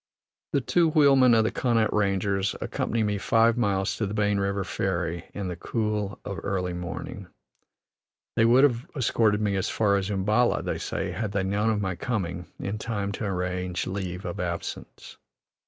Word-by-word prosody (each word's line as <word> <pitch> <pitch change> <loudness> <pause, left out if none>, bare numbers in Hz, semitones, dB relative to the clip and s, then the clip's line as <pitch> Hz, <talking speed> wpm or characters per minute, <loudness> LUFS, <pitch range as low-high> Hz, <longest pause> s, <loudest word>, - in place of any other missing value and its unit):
The 140 - +3
two 170 +5 +3
wheelmen 135 -6 +6
of 110 - +4
the 110 - 0
Connaught 115 -3 +1
Rangers, 100 -1 +1
accompany 115 -1 -1
me 105 -1 0
five 115 +2 +3
miles 100 -5 0
to 105 - -1
the 100 - -4
Bane 105 -1 +2
River 100 0 0
ferry, 85 -3 -2
in 100 -2 -3
the 90 - -4
cool 105 +1 -2
of 100 - -4
early 90 -2 -2
morning. 85 -1 -6 1.1
They 115 - +4
would 125 +4 +6
have 125 -3 +2
escorted 110 -5 +2
me 100 -2 +1
as 95 - -1
far 100 -2 +2
as 95 0 -2
Umballa, 105 +5 +2
they - - -2
say, - - -3
had 110 -3 -3
they 95 - +1
known 100 +3 +1
of 105 -2 +1
my 95 -2 -2
coming 90 -5 -3
in 105 +2 -3
time 100 -3 -2
to 105 - -4
arrange 90 -1 -2
leave' 95 -1 -4
of 90 - -4
absence. 85 -2 -5
100 Hz, 175 wpm, -26 LUFS, 95-115 Hz, 1.1 s, wheelmen